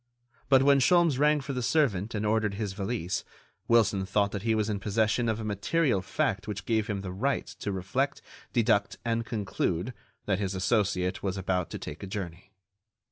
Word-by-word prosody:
But 135 -1 +6
when 140 0 +5
Sholmes 165 -1 +4
rang 150 0 +4
for 140 +1 -5
the 125 - -2
servant 115 - +1
and 105 0 -1
ordered 105 -1 +1
his 105 -2 -3
valise, 95 -2 -2 0.4
Wilson 110 -4 +3
thought 100 +1 +1
that 100 - -4
he 115 +1 +1
was 105 -1 +1
in 105 -2 -1
possession 110 +3 +1
of 110 0 -1
a - - -4
material 110 - +1
fact 95 - -1
which 100 -2 -5
gave 110 -2 +1
him 100 -3 -2
the 95 -2 -5
right 130 +10 -1
to 100 - -5
reflect, 115 +10 -1 0.3
deduct 105 -4 +2
and 115 0 -1
conclude 100 -1 -2 0.3
that 100 -2 0
his 100 -1 -2
associate 95 -2 +1
was 95 -1 -2
about 90 -2 -1
to - - -5
take - - -8
a 100 - -6
journey. 95 -1 -6
105 Hz, 190 wpm, -28 LUFS, 95-120 Hz, 0.4 s, But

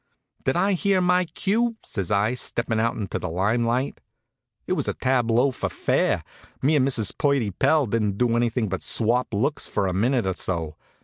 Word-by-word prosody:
"Did - - +1
I 200 +1 +2
hear 195 +1 +2
my 180 0 +3
cue?" 225 +7 0
says 100 -5 -3
I, 105 +3 +2
steppin' 115 -2 -2
out 115 +1 +1
into 100 -4 -4
the - - -4
lime 100 +8 +1
light. 125 +4 -1 0.6
It - - -1
was - - -2
a - - -1
tableau, 125 0 +2
for 120 - -3
fair. - - 0 0.4
Me 150 +4 +2
and 135 -2 +3
Mrs. 115 -7 +1
Purdy 140 -8 +1
Pell 150 - +2
didn't 105 -3 -1
do 120 0 +2
anything 120 -1 0
but 95 -1 -3
swap 120 +2 +1
looks 135 +8 0
for 100 - -1
a 95 - -1
minute 120 +5 +1
or 95 - 0
so. 85 -4 -3
120 Hz, 190 wpm, -24 LUFS, 105-140 Hz, 0.6 s, my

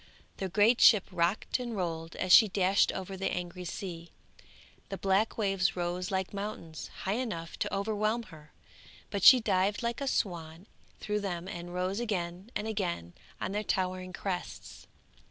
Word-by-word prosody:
The 190 - -3
great 215 +6 +4
ship 210 -5 +8
rocked 180 +8 0
and 240 -3 -4
rolled 165 -2 -3
as 185 - -2
she 220 - +9
dashed 190 0 +3
over 190 0 -5
the 190 +1 -2
angry 180 0 -5
sea, 170 -2 -6 0.8
the 195 - -4
black 195 +4 +1
waves 195 -4 +1
rose 180 +1 -2
like 190 0 -2
mountains, 200 -6 -6 0.2
high 190 - 0
enough 170 -10 -4
to - - -1
overwhelm 215 +3 0
her, 150 -1 -14 0.6
but 200 -2 -2
she 255 +6 +10
dived 200 0 +1
like 235 +3 -2
a 275 - -2
swan 170 -6 -2 0.3
through 210 0 -1
them 180 -3 -4
and 175 -1 -7
rose 185 +3 -1
again 185 -3 -3
and 210 - -2
again 175 - -3 0.3
on - - -3
their 205 +1 -1
towering 185 -2 -1
crests. 180 0 -6
190 Hz, 160 wpm, -30 LUFS, 175-210 Hz, 0.8 s, she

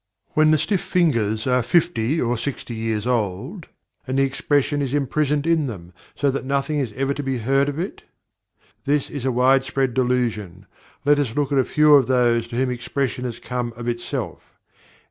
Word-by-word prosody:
When 155 0 +3
the 155 - +5
stiff 180 +6 0
fingers 115 - +1
are 125 -1 +2
fifty 155 -1 +1
or 120 -3 0
sixty 125 0 -5
years 110 -1 -2
old, 125 - -2 0.4
and 130 +1 -1
the 135 - +4
expression 145 +1 0
is 135 0 -1
imprisoned 145 +1 0
in 165 -3 +2
them, 90 -7 -8 0.2
so 140 -1 +1
that 140 - -3
nothing 140 +3 -1
is 130 -6 -2
ever 135 +3 -1
to 145 - -4
be 135 -2 -2
heard 135 +5 +1
of 145 - -5
it? 180 +4 -4 0.8
This 145 0 0
is 140 -3 -5
a 130 - +2
wide 130 +2 +4
spread 135 -2 -1
delusion. 115 -7 -1 0.4
Let 145 0 +4
us 125 -6 -1
look 145 -2 0
at 140 - +3
a - - +4
few 150 0 +4
of 140 -4 +6
those 120 -2 +2
to 115 - -8
whom 130 +1 +1
expression 125 +1 -2
has 120 -2 -4
come 120 -1 -4
of 120 0 -7
itself. 120 0 -5
130 Hz, 190 wpm, -22 LUFS, 120-145 Hz, 0.8 s, of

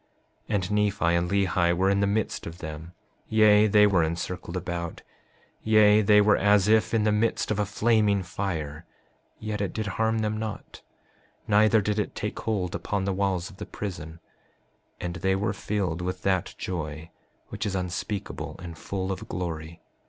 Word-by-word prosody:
5:44 110 - +1
And 95 0 -1
Nephi 105 -2 +1
and 85 +1 +1
Lehi 90 -3 +2
were 95 +1 +3
in 100 - +2
the 100 - +2
midst 105 +1 -1
of 85 +1 -8
them; 80 0 -8 0.4
yea, 110 -1 +5
they 105 0 +6
were 100 -4 +3
encircled 85 +2 -4
about; 85 -1 -5 0.6
yea, 110 -1 +5
they 105 0 +5
were 105 +1 +5
as 100 -1 +4
if 110 0 +3
in 110 - +2
the 105 - +3
midst 110 +1 0
of 105 - 0
a 105 - 0
flaming 105 -2 +2
fire, 85 -4 -4 0.5
yet 105 -1 -4
it 100 - -2
did 110 - -3
harm 110 +3 0
them 110 -1 -1
not, 110 -1 -6 0.7
neither 110 +1 +4
did 105 +1 -1
it 105 - -3
take - - -4
hold 95 -5 -2
upon 100 -2 -2
the 100 - 0
walls 95 -1 -1
of 95 - -16
the - - -6
prison; 85 -5 -6 0.8
and 90 0 -4
they 95 0 +1
were 100 +2 -1
filled 95 -5 -2
with 90 0 -4
that 95 -2 0
joy 80 -2 -5 0.4
which - - -5
is 100 - -2
unspeakable 90 +3 -4
and 85 -2 -9
full 95 -1 -3
of 95 - -6
glory. 85 -2 -5
100 Hz, 175 wpm, -26 LUFS, 90-105 Hz, 0.8 s, they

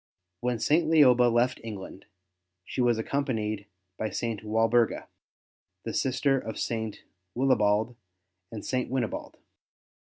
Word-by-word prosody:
When 125 +1 -1
St. 155 +7 +2
Lioba 125 -6 +6
left 120 +2 +1
England 100 -3 -8 0.6
she - - -3
was 120 -2 +3
accompanied 110 -5 -2 0.3
by 110 - -1
St. 115 +1 -3
Walburga, 115 +2 +2 0.8
the - - -4
sister 135 +1 +1
of 110 -3 -6
St. 110 -2 -3 0.3
Willibald 115 -3 +2 0.6
and 110 -3 -7
St. 130 -1 -1
Winibald. 125 -3 -3
120 Hz, 110 wpm, -28 LUFS, 110-130 Hz, 0.8 s, Lioba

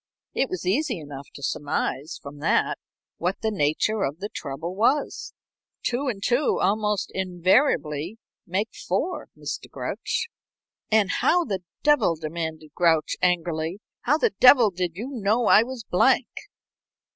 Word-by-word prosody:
It 265 - 0
was 185 -1 -4
easy 235 - +1
enough 145 -2 -9
to 140 - -10
surmise 145 +3 -2
from 145 +1 -9
that - - +1 0.4
what 180 +3 -1
the 220 - +1
nature 195 +5 +1
of 145 -3 -1
the 205 +4 -5
trouble 160 +3 -5
was. 250 +8 +1 0.5
Two 255 +3 -1
and 205 -6 -3
two 250 +5 +2
almost 210 0 0
invariably 180 - +1 0.3
make 200 +5 -1
four, 290 - -2
Mr. - - -5
Grouch." - - -3 0.6
"And 215 -3 +3
how 350 0 +2
the 195 -7 -3 0.2
devil," 280 - +4
demanded 160 0 -5
Grouch, 165 -3 +2
angrily 170 0 0 0.2
"how 295 +5 +2
the - - +1
devil 250 -5 +7
did 180 -2 -3
you 220 +7 -5
know 230 -3 0
I 210 - +7
was 245 0 -5
Blank?" 240 +7 +3
190 Hz, 140 wpm, -25 LUFS, 165-230 Hz, 0.6 s, devil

